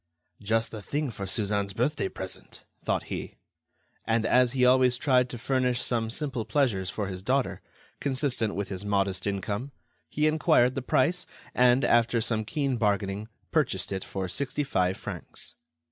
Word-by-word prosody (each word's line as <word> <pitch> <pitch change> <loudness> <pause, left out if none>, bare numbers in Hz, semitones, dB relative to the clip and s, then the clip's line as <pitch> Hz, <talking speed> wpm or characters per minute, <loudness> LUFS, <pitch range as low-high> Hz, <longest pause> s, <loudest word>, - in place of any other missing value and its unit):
"Just 110 +2 +1
the 110 - -6
thing 145 +5 -2
for 100 -3 -6
Suzanne's 100 0 0
birthday 120 -1 0
present," 95 -1 -7 0.2
thought - - 0
he. - - -6 0.7
And 115 -1 +2
as 125 -1 +4
he 130 -2 +3
always 125 0 +5
tried 125 -2 +3
to 120 - -6
furnish 125 0 +1
some 115 -2 0
simple 130 -1 -2
pleasures 110 -5 +1
for 105 +1 -3
his 95 -1 -5
daughter, 130 +6 0 0.4
consistent 130 -6 0
with 100 0 -3
his 95 0 -4
modest 100 -2 0
income, 100 +7 -3 0.4
he 150 - 0
enquired 155 -5 +4
the 135 - -2
price, 155 +7 +1 0.3
and, 125 +1 +4
after 120 0 +3
some 110 -1 0
keen 140 0 -1
bargaining, 100 -1 0 0.2
purchased - - +1
it 95 -1 -2
for 95 -1 -4
sixty 140 +8 -2
five 95 -8 +1
francs. - - -6
120 Hz, 160 wpm, -28 LUFS, 100-130 Hz, 0.7 s, always